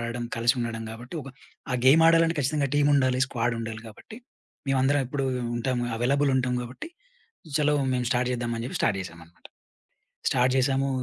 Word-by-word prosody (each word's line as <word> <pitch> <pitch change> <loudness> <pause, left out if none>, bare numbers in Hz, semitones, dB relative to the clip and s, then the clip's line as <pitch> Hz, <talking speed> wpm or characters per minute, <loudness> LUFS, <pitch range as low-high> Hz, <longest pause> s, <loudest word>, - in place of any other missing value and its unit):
ఆడడం 120 +1 -4
కలిసుండడం 120 -1 0
గాబట్టి 120 +6 -9
ఒక 135 - -9 0.4
ఆ - - +1
గేమ్ 145 +5 +7
ఆడాలంటే 165 0 +4
ఖచ్చితంగా 140 0 0
టీముండాలి, 140 -3 +3
స్క్వాడుండాలి 115 -3 -3
గాబట్టి 110 - -12 0.5
మేవందరం 135 +2 +2
ఎప్పుడూ 135 +1 -2 0.3
ఉంటాము, 120 0 -1
అవైలబుల్ 140 +4 +2
ఉంటాం 125 -1 0
గాబట్టి 125 - -8 0.7
చలో! 150 0 +2 0.2
మేము 125 -1 -1
స్టార్ట్ 125 0 +1
జేద్దాం 120 -1 -2
అని 115 - -4
చెప్పి - - -4
స్టార్ట్ 95 -4 +1
చేసామనమాట. 85 -1 -13 0.8
స్టార్ట్ 125 0 +2
జేశాము 135 +1 +1
125 Hz, 145 wpm, -26 LUFS, 120-140 Hz, 0.8 s, గేమ్